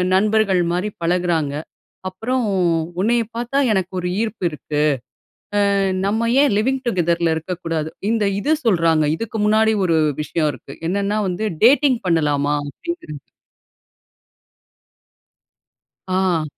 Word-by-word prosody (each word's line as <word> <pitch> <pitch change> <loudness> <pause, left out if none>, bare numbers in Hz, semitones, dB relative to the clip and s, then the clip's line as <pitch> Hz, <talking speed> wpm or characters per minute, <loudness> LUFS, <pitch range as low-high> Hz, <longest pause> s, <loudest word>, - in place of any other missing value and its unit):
நண்பர்கள் 205 -2 +3
மாரி 185 +4 -1
பழகுறாங்க. 165 -4 0 0.5
அப்புறம், 240 +7 -2 0.6
உன்னைய 230 +3 +2
பாத்தா, 240 +4 -2
எனக்கு 190 -3 0
ஒரு 180 - -3
ஈர்ப்பு 220 -4 -4
இருக்கு. 150 -1 -3 0.9
அ, - - +2 0.3
நம்ம 225 +3 0
ஏன் 285 - +3
லிவிங் 260 +5 +1
டுகெதர்ல 170 -5 +1
இருக்கக்கூடாது. 165 -2 -3 0.2
இந்த 225 -2 +1 0.2
இது 305 +6 +2
சொல்றாங்க. 165 -7 +3
இதுக்கு 225 +2 -5
முன்னாடி 220 +1 +3
ஒரு 165 -2 +2 0.2
விஷயம் 155 -1 0
இருக்கு. 135 +2 -11
என்னென்னா 200 +3 0
வந்து, 185 +5 -2 0.2
டேட்டிங் 270 -1 +5
பண்ணலாமா? 145 -3 +1 0.2
அப்படிங்கிறது. 160 - -7 2.9
ஆ. 185 -4 +1
185 Hz, 110 wpm, -20 LUFS, 165-220 Hz, 2.9 s, டேட்டிங்